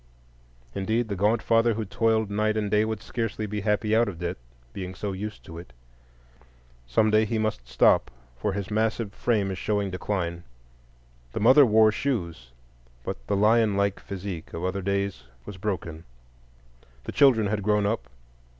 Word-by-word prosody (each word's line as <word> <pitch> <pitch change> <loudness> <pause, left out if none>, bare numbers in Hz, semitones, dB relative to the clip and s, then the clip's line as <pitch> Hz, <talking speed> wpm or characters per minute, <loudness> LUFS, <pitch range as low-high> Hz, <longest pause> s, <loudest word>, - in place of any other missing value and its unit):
Indeed, 110 +4 -1
the 100 - -2
gaunt 105 +4 +1
father 115 0 +3
who 110 0 -3
toiled 110 +1 +1
night 110 +1 +1
and 105 -2 -1
day 105 +1 +3
would 110 -1 -4
scarcely 115 -2 -3
be 105 0 -4
happy 105 +1 +1
out 115 +1 +4
of 95 -5 -5
debt, 85 +1 -3 0.4
being 95 -1 -6
so 100 +2 -4
used 105 +2 -6
to 85 -3 -9
it. 85 -8 -13 1.1
Some 105 - +2
day 110 0 +4
he 110 +1 -1
must 110 - -2
stop, 65 0 +3 0.3
for 80 +11 -2
his 100 +1 -4
massive 110 -1 0
frame 105 -6 0
is 95 - -5
showing 100 -2 -1
decline. 90 -2 -3 0.9
The - - -2
mother 130 +5 +7
wore 110 0 +5
shoes, 85 - -3 0.5
but - - -6
the 100 - +1
lion 105 0 +3
like 100 0 +1
physique 95 -4 -7
of 85 +2 -3
other 95 +1 -2
days 100 -6 -2 0.2
was 105 - -8
broken. 85 -5 -4 1.0
The - - -5
children 130 -7 +5
had 105 +1 -1
grown 105 0 +2
up. 105 - -2
105 Hz, 170 wpm, -26 LUFS, 95-110 Hz, 1.1 s, mother